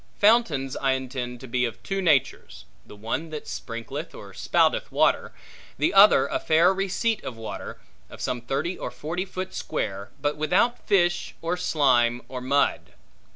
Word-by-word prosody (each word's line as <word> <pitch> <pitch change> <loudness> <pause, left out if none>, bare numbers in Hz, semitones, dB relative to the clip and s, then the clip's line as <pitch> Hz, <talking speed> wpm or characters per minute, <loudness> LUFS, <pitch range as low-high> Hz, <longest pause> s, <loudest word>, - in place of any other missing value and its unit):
Fountains 205 - +3
I 135 -1 +1
intend 125 -2 -4
to 130 - -9
be 125 +1 0
of 115 -2 -4
two 195 0 -2
natures: 150 -8 0 0.2
the - - -13
one 115 +10 -4
that 155 -1 -6
sprinkleth 115 -2 -6
or - - -11
spouteth - - +1
water; - - +2 0.5
the - - +1
other - - +7
a - - -2
fair 165 +4 +4
receipt 195 +3 -1
of 120 - -6
water, 115 -1 -7 0.3
of - - -12
some 125 -1 -2
thirty 140 +9 -2
or - - -4
forty 175 +5 -4
foot 185 0 -6
square, 100 +1 -4
but 145 +1 -1
without 180 +10 +1
fish, 175 -4 +1
or 170 +2 0
slime, 125 -8 +2
or 130 -1 -5
mud. 140 +3 0
145 Hz, 160 wpm, -25 LUFS, 125-180 Hz, 0.5 s, other